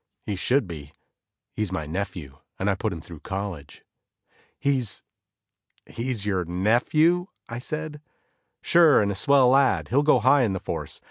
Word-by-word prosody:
He 105 - -3
should 125 +5 +1
be, 75 -4 -9 0.6
he's 105 -3 -3
my 80 -5 -3
nephew 80 -4 -6 0.2
and 100 +2 0
I - - +2
put 105 +3 -2
him 85 -3 -6
through 85 -1 -11
college." 95 -7 -6 0.7
"He's 135 -6 0 0.8
he's 115 -3 -4
your 95 -3 0
nephew?" 125 - +2 0.2
I 120 +1 -6
said. 155 +2 -6 0.6
"Sure, 165 -9 +5
and 100 - 0
a - - -4
swell 135 +4 +4
lad; 135 0 +3
he'll 140 +4 +3
go 150 -2 +4
high 130 +4 +4
on 105 -5 0
the 95 - -3
force. - - -6
105 Hz, 155 wpm, -25 LUFS, 95-140 Hz, 0.8 s, Sure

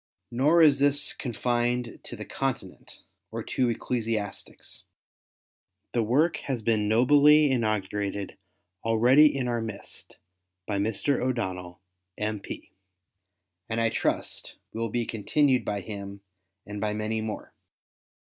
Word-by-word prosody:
Nor 150 +8 +4
is 145 -3 +6
this 145 +1 +2
confined 120 -1 -1
to - - -7
the - - -7
Continent - - -5 0.3
or - - -5
to 125 -2 0
ecclesiastics. 115 -3 -4 1.1
The 120 - +2
work 145 +10 +2
has 125 -5 -4
been 110 -2 +1
nobly 145 +6 +6
inaugurated 105 -4 -1 0.5
already 120 +7 +6
in 130 -2 -1
our 120 -1 -1
midst 110 -3 -7 0.5
by 100 -2 -1
Mr. 110 +6 0
O'Donnell, 95 -8 -3 0.4
M.Y., 105 -1 -5 1.0
and 110 +1 -1
I 115 0 +3
trust - - -2 0.2
will 115 0 -2
be 120 +2 -1
continued 130 +5 +2
by 100 -1 -2
him 100 0 -7 0.4
and 105 +1 -6
by 105 -1 0
many 110 +1 -2
more. 110 -1 -6
115 Hz, 120 wpm, -27 LUFS, 105-130 Hz, 1.1 s, is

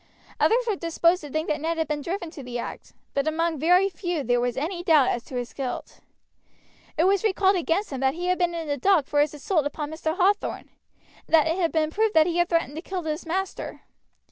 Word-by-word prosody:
Others 480 +2 +3
were 440 -3 0
disposed 335 +1 +1
to 295 - -8
think 310 +3 -2
that 300 - -1
Ned 330 +1 -1
had 320 - 0
been 300 -1 -2
driven 345 +1 -4
to 305 - -9
the 245 -2 -5
act; 235 - -7 0.2
but 280 +2 0
among 320 0 0
very 360 +5 +4
few 350 -5 -3 0.2
was 245 0 -1
there 270 - -2
any 350 +2 -4
doubt 305 -6 +5
as 240 - -1
to 260 - -9
his 245 -1 -4
guilt. 265 -3 -5 1.0
It 325 - +3
was 390 +2 +3
recalled 390 -2 +3
against 350 +3 0
him 270 - -4
that 265 +1 +1
he 350 +1 -4
had 365 +1 +1
before 350 -1 +2
been 340 - -4
in 320 - -7
the 285 -1 -1
dock 335 +1 +3
for 290 +1 +2
his 295 0 0
assault 295 +1 0
upon 295 0 -5
Mr. 315 +1 -3
Hathorn, 400 +2 +1 0.6
and - - +4
that 310 - +5
it 325 +2 0
had 335 -3 +1
been 315 -1 +1
proved 435 +3 +1
that 315 -1 +6
he 345 -1 -1
had 345 0 +2
threatened 330 -5 0
to - - -4
kill 365 0 -5
his 315 +1 -4
master. 380 +3 -3
330 Hz, 245 wpm, -25 LUFS, 295-360 Hz, 1.0 s, that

